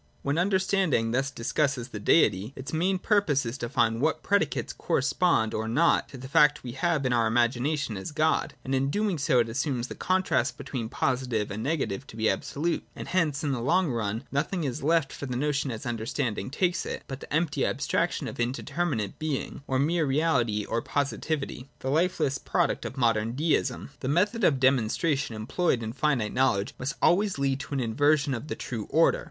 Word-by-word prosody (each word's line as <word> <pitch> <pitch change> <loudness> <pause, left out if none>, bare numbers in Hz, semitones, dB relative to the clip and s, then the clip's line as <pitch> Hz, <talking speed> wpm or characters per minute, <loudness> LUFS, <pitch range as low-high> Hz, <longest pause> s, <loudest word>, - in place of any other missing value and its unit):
(a) - - -38 0.2
When 140 +4 0
understanding 185 - +2
thus 135 +3 +1
discusses 135 0 -1
the 110 - -6
Deity, 105 - +3
its 130 +3 -7
main 185 +4 +1
purpose 180 - +2
is 115 +1 -3
to 120 - -3
find 120 -4 +1
what 155 +2 +1
predicates 200 0 0
correspond 140 -6 +1
or 110 +1 -2
not 150 +9 +2
to 135 - -9
the 130 +1 -8
fact 145 +2 +4
we 125 - -5
have 155 +1 0
in 125 - +2
our 115 -2 +3
imagination 120 +3 +1
as 95 - -6
God. 155 +1 +1
And 135 - -2
in 135 0 +2
so - - -1
doing 205 -1 0 0.2
it 115 - -1
assumes 130 0 -2
the - - -5
contrast 185 -8 0
between 115 -5 -5
posi 130 0 -1
tive 110 -3 -1
and 105 +2 -4
negative 140 -4 -2
to - - -12
be 110 0 +1
absolute; 150 +4 -2
and - - -7
hence, 160 -7 +1
in 145 - 0
the 125 -3 -2
long 150 +6 +2
run, 110 0 -2
nothing 160 +5 -1
is 130 -4 -3
left 160 -1 +2
for 140 - -6
the 125 - -3
notion 145 0 0
as 115 -3 -6
understanding 115 +1 -2
takes 175 +5 0
it, - - -5
but 135 -1 -6
the - - -12
empty 155 0 +1
abstraction - - 0
of - - -7
indeterminate 125 - -2
Being, 155 -3 -3
of 130 0 +2
mere 165 +2 +2
reality 130 -8 +1
or 115 - -1
positivity, 140 -1 -2
the 130 - -3
lifeless 155 -4 +1
product - - 0
of 135 - -6
modern 115 -2 +1
'Deism.' 155 +3 0
(6) 140 - -25
The 130 - -4
method 205 - +1
of 140 -7 +4
demonstration 135 +1 +1
employed 115 +4 0
in 110 0 -4
finite 130 -5 0
knowledge 120 -6 +1
must 135 +2 -3
always 195 +1 +3
lead 135 -1 0
to 140 +1 -5
an - - 0
inversion 140 +4 +2
of 125 +4 -5
the - - -3
true 115 -5 -5
order. 160 +3 +4
135 Hz, 200 wpm, -27 LUFS, 120-155 Hz, 0.2 s, fact